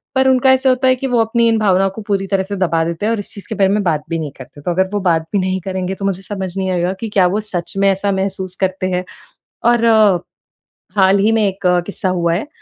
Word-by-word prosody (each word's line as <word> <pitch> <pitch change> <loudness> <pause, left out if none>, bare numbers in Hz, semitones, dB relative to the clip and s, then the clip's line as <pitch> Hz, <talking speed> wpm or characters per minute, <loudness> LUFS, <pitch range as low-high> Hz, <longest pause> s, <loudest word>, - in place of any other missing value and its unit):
पर 265 0 +3
उनका 260 0 +4
ऐसा 260 0 +3
होता 255 +1 +2
है 255 - +5
कि 270 +2 -4
वो 245 -2 +1
अपनी 230 +1 +2
इन 225 - +2
भावनाओं 195 -2 +3
को 220 - -6
पूरी 195 -2 -1
तरह 195 -1 0
से 200 +1 -5
दबा 170 -4 +1
देते 170 +4 -3
हैं 220 - +1
और 225 - -2
इस 205 - -7
चीज़ 200 - -9
के 220 - -3
बारे 195 -1 +3
में 210 - +1
बात 155 -5 0
भी 165 -1 -2
नहीं 150 -3 -4
करते। 135 +2 -12
तो 175 - -2
अगर 190 +2 +1
वो 205 - 0
बात 165 -1 +2
भी 200 - +2
नहीं 185 0 -1
करेंगे 185 0 -3
तो 195 - -5
मुझे 195 -1 -1
समझ 190 -2 -5
नहीं 190 -1 -1
आएगा 180 +1 0
कि 225 - -4
क्या 185 -2 +5
वो 195 +4 0
सच 175 -2 -4
में 195 0 +3
ऐसा 195 +1 -1
महसूस 190 -1 -2
करते 185 0 -1
हैं, 180 0 -1 0.6
और 235 0 +3 1.1
हाल 190 0 +4
ही 210 +3 +3
में 220 -2 +2
एक 195 0 -4 0.3
किस्सा 195 -1 -3
हुआ 170 -2 0
है 190 +11 -2
195 Hz, 265 wpm, -17 LUFS, 185-215 Hz, 1.1 s, है